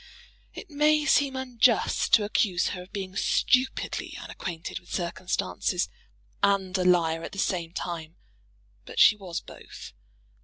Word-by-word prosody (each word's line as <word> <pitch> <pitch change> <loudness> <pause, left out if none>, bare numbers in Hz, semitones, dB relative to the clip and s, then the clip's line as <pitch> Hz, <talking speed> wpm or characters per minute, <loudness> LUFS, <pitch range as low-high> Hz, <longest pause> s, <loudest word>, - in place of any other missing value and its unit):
It 390 - -10
may 300 +1 +3
seem 280 -3 +3
unjust 250 -3 +1
to 215 - +1
accuse 205 -4 +1
her 180 - -5
of 180 - -14
being 190 -2 -6
stupidly 255 +5 0
unacquainted 170 -2 -6
with 175 - -19
circumstances, 175 0 -2 0.5
and 195 -2 +1
a 185 - +1
liar 165 -3 +3
at - - -7
the - - -9
same 175 -4 -1
time; 165 -2 -5 0.7
but - - -11
she - - +8
was 185 -5 -6
both. - - -12
190 Hz, 140 wpm, -27 LUFS, 175-245 Hz, 0.7 s, she